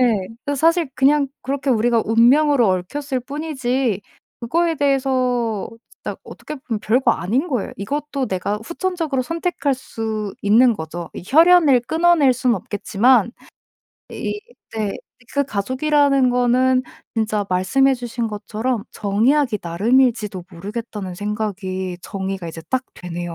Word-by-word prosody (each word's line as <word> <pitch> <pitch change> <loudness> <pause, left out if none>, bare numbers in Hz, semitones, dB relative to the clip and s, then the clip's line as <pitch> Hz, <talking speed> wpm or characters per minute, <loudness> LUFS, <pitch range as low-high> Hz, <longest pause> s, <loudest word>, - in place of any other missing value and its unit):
예. 240 -3 +4 0.3
그 285 0 -1
사실 330 +2 +3
그냥 280 +2 +3
그렇게 275 +1 -1
우리가 235 0 +2
운명으로 245 +2 +4
얽혔을 255 +9 -2
뿐이지 260 - -2 0.4
그거에 330 +8 +1
대해서 255 -6 0 0.3
진짜 - - -4
어떻게 300 - -8
보면 230 -5 -4
별거 250 +5 +3
아닌 250 - -1
거예요. 245 -8 -2
이것도 280 +5 -3
내가 200 +1 -2
후천적으로 335 -4 -2
선택할 330 -2 -1
수 220 -5 -5
있는 230 +4 +5
거죠. 170 -1 -6
이 - - -7
혈연을 320 - +6
끊어낼 325 -5 +4
순 250 -1 +1
없겠지만 220 +5 +2 0.8
이 415 - -4 0.4
네. 210 -2 -1 0.4
그 280 0 +1
가족이라는 275 +4 +2
거는 255 +1 +3 0.3
진짜 215 -3 0
말씀해 225 +10 +3
주신 240 -1 -4
것처럼 220 +2 -3
'정의하기 220 +3 +1
나름일지도 210 +1 +1
모르겠다.'는 205 0 -6
생각이 190 -3 -3
정의가 190 -3 -4
이제 165 0 -8
딱 260 0 +1
되네요. 175 -1 -6
245 Hz, 305 characters per minute, -20 LUFS, 205-275 Hz, 0.8 s, 혈연을